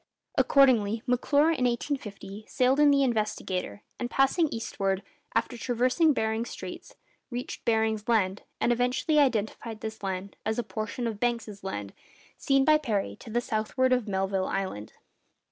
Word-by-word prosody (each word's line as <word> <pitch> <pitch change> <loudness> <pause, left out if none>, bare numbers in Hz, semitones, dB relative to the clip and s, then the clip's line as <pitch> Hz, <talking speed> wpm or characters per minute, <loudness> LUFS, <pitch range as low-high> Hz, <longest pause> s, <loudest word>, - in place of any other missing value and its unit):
Accordingly, 230 -6 +4
M'Clure, 285 +5 +3
in 255 -6 0
1850, 220 -5 -3
sailed 260 +2 +2
in 295 -1 +6
the 280 -1 +4
'Investigator,' 210 -5 -2 0.2
and 245 - -2
passing 270 +6 +3
eastward, 195 -6 -2 0.3
after 245 - 0
traversing 255 +7 +2
Behring's 220 -2 -1
Straits, - - -8 0.3
reached 245 0 -5
Baring's 220 -1 +1
Land, 200 -4 +2 0.2
and 240 - +2
eventually 250 +5 +1
identified 225 -3 0
this 220 0 -6
land 195 0 -4
as 220 +1 -1
a 240 - 0
portion 220 +2 -4
of 220 -3 -3
Banks' 230 -4 -2
Land, 100 - -5 0.4
seen 275 -1 +2
by 305 0 +5
Parry 205 - -2
to - - -12
the 240 +2 0
southward 245 +2 0
of 250 -3 0
Melville 190 -1 0
Island. 190 - -4
230 Hz, 145 wpm, -28 LUFS, 205-255 Hz, 0.4 s, in